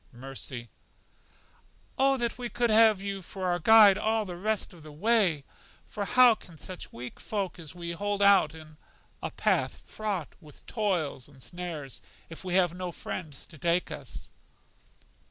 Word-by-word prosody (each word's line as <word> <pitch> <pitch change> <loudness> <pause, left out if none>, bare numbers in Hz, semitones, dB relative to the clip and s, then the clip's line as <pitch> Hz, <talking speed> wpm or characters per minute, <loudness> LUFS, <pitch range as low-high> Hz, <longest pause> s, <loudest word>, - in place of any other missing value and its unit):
Mercy: 125 -2 -5 1.2
O 270 0 +3
that 235 -2 -1
we 245 -1 -5
could 235 +1 +1
have 215 -2 +5
you 200 -1 -3
for 185 +1 -6
our 175 -1 +1
guide 210 +1 +7
all 220 0 +1
the 180 -2 -6
rest 210 +2 -1
of 170 - -14
the 155 0 -11
way! 180 -3 +2 0.4
For 205 - -4
how 250 +4 +7
can 170 -6 -13
such 185 +4 -7
weak 125 +1 -8
folk 195 -4 -3
as 160 0 -6
we 170 -1 -5
are - - -8
hold 205 +1 -1
out 200 -6 +5
in 155 -1 -13 0.4
a - - -3
path - - 0
fraught 205 -7 -3
with 150 -3 -16
toils 180 - -1
and 140 -2 -18
snares, 155 +1 -6 0.3
if 165 - -9
we 180 -1 -2
have 180 -3 +3
no 180 0 -4
friends 155 -4 -6
to 155 - -14
take 170 +2 +1
us? - - -8
180 Hz, 170 wpm, -29 LUFS, 155-210 Hz, 1.2 s, guide